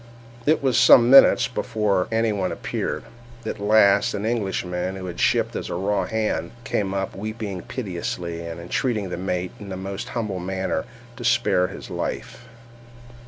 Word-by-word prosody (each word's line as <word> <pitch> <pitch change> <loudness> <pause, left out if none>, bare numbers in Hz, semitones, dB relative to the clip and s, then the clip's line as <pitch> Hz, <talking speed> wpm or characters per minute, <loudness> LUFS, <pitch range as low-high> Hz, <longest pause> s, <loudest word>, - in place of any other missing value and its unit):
It 155 -1 +3
was 130 -4 +3
some 120 0 +7
minutes 135 - +8
before 100 -4 0
any 115 -1 +1
one 95 -3 -1
appeared:—at 120 -2 -5
last 100 -1 +4
an 105 +1 -3
Englishman, 95 -5 -2
who 95 -1 -6
had 90 -2 -6
shipped - - +2
as - - -4
a - - -3
raw 95 +1 0
hand, 110 +1 -2
came 100 -3 -1
up, 95 -1 -3
weeping 105 -2 -5
piteously, 85 -6 -4
and 85 0 -6
entreating 105 +4 -1
the 90 - -4
mate, 90 0 -2
in 100 - -9
the 95 - -5
most 95 +1 -5
humble 105 -5 -2
manner, 95 -2 -2 0.3
to - - -7
spare 120 -6 +3
his - - -9
life. 120 - -5
100 Hz, 160 wpm, -23 LUFS, 90-110 Hz, 0.3 s, minutes